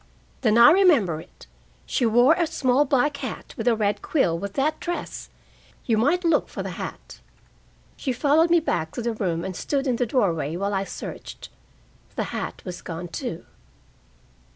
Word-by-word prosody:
"Then 225 -3 +3
I 235 +3 +9
remember 295 - +4
it. - - -17 0.4
She 245 - +1
wore 240 +6 +5
a 340 -1 0
small 265 0 +2
black 280 +1 +1
hat - - -6
with - - -4
a 235 - +5
red 205 -1 0
quill 265 - +1
with 200 +4 -5
that 290 +3 0
dress. 350 0 -5 0.6
You 230 - +2
might 320 +10 +2
look 330 -3 +2
for - - -5
the - - -5
hat." - - -8 0.8
She 265 - -2
followed 295 +6 +3
me 340 0 +5
back 160 - -2
to 240 - -3
the 235 0 -1
room 175 -6 -2
and 190 - -5
stood 275 +6 -2
in 250 -3 0
the 245 - 0
doorway 170 - 0
while 200 +3 -2
I 195 0 0
searched. - - -8 0.7
The - - -1
hat - - -5
was 180 -2 -6
gone, 170 +1 -6
too. 245 - -5
240 Hz, 175 wpm, -24 LUFS, 195-290 Hz, 0.8 s, I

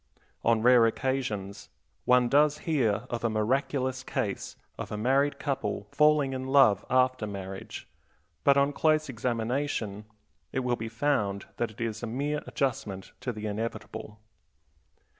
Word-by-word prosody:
On 115 -1 +3
rare 125 -2 +7
occasions 110 -6 -3 0.4
one 125 -1 +5
does 150 +3 +4
hear 125 -11 +1
of 120 -1 -3
a 115 - +2
miraculous 130 +4 0
case 100 -6 -3 0.2
of - - -5
a 105 - -3
married 135 +6 +2
couple 140 -1 -2
falling 150 -1 +3
in 130 0 -4
love 130 -8 +5
after 130 -3 +2
marriage, 95 -1 -7 0.6
but 140 0 +5
on 140 +1 +3
close 155 0 +2
examination 115 -3 -2 0.5
it 130 - -1
will 125 -1 0
be 115 -1 -5
found 110 -6 0
that 120 - 0
it 110 - -16
is 115 -1 -3
a 120 - -3
mere 145 +6 -2
adjustment 105 -8 -2
to 125 - -2
the 110 -2 -7
inevitable. 110 0 -5
125 Hz, 140 wpm, -28 LUFS, 110-140 Hz, 0.6 s, rare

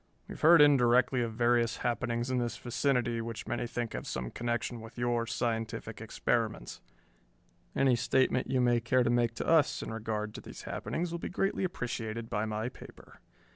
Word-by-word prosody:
"We - - -7
have - - -11
heard 165 -1 +8
indirectly 125 -2 +4
of 115 -2 -2
various 120 0 +2
happenings 120 +1 -1
in 130 - +1
this 120 -1 -2
vicinity 120 -2 0
which 115 0 -6
many 120 - -2
think 120 -1 -4
have - - -5
some 60 -1 -4
connection 120 0 -3
with 115 +1 -12
your 120 -1 0
scientific 115 -1 -3
experiments. - - -2 0.9
Any 135 -2 +4
statement 130 +1 +1
you 130 -1 +2
may 120 -1 +3
care 125 +2 +2
to 120 - +1
make 120 -1 +1
to - - -4
us 160 -3 +3
in - - -5
regard 110 -1 -3
to - - -8
these - - -10
happenings 170 +1 -3
will 170 - -3
be - - -5
greatly 195 +1 -1
appreciated 115 -9 -4
by 105 +1 0
my 110 +2 -2
paper. 130 - -13
120 Hz, 180 wpm, -31 LUFS, 115-125 Hz, 0.9 s, heard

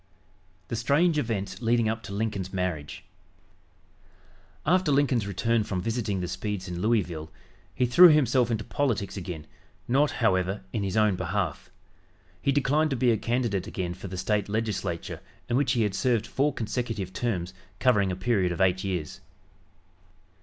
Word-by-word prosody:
THE - - -2
STRANGE 150 +8 +2
EVENTS 110 -6 -3
LEADING 115 -1 +2
UP 110 +1 -1
TO 110 - -9
LINCOLN'S 100 -3 -2
MARRIAGE 90 -6 -3 1.6
After 180 0 +3
Lincoln's 130 -6 +2
return 115 +3 +1
from 95 -3 -3
visiting 110 -4 -1
the 90 - -2
Speeds 105 0 -4
in 90 -1 -4
Louisville, 90 -8 0 0.5
he 125 - +2
threw 150 +10 +8
himself 130 -6 +4
into 110 -2 -1
politics 115 -8 -1
again, 85 -5 -6 0.4
not, 140 +4 +3
however, 95 -3 0
in 110 - -1
his 100 +1 -2
own 105 -3 +4
behalf. 95 -2 -2 0.7
He 140 - +2
declined 145 +3 +2
to 135 - -1
be 125 0 +3
a - - +3
candidate 115 -5 -1
again 90 -2 -3
for 95 +2 -8
the 95 0 -6
State 100 +3 0
Legislature, 105 -6 -3 0.3
in 120 - 0
which 135 +1 +2
he 120 -3 +2
had 105 -2 0
served 120 -2 +1
four 140 +5 +1
consecutive 110 -5 -3
terms, 95 -6 -2 0.2
covering 100 -5 +3
a - - -2
period 95 -2 +1
of 85 - -4
eight 95 -1 +2
years. 90 -6 -4
105 Hz, 160 wpm, -27 LUFS, 95-120 Hz, 1.6 s, threw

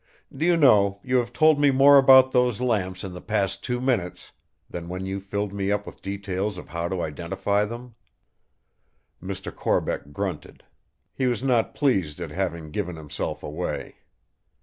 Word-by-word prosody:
Do 160 - 0
you 175 -1 +4
know, 100 -9 +4
you 130 0 +1
have 120 -1 -1
told 155 +3 +4
me 145 -1 +5
more 140 +1 +7
about 130 -1 +7
those 125 -3 +2
lamps 100 -7 -1
in 95 -2 -6
the 90 - -8
past 100 -2 -1
two 125 -1 -2
minutes 120 -9 -2 0.4
than 85 -1 -7
when 90 +1 -5
you 95 +1 -3
filled 100 +1 -4
me 100 0 -1
up 105 0 -1
with - - -11
details 100 0 -3
of 90 - -10
how 85 +2 -3
to 90 -1 -3
identify 95 +6 -1
them." 120 +2 -8 1.3
Mr. 95 0 -6
Corbeck 70 - -1
grunted; 70 - -5 0.5
he 130 - -1
was 120 -1 -1
not 125 -4 +1
pleased 95 - 0
at - - -6
having 80 -2 -3
given 90 -1 -3
himself 75 -2 -5
away. 80 +4 -5
100 Hz, 170 wpm, -24 LUFS, 90-125 Hz, 1.3 s, more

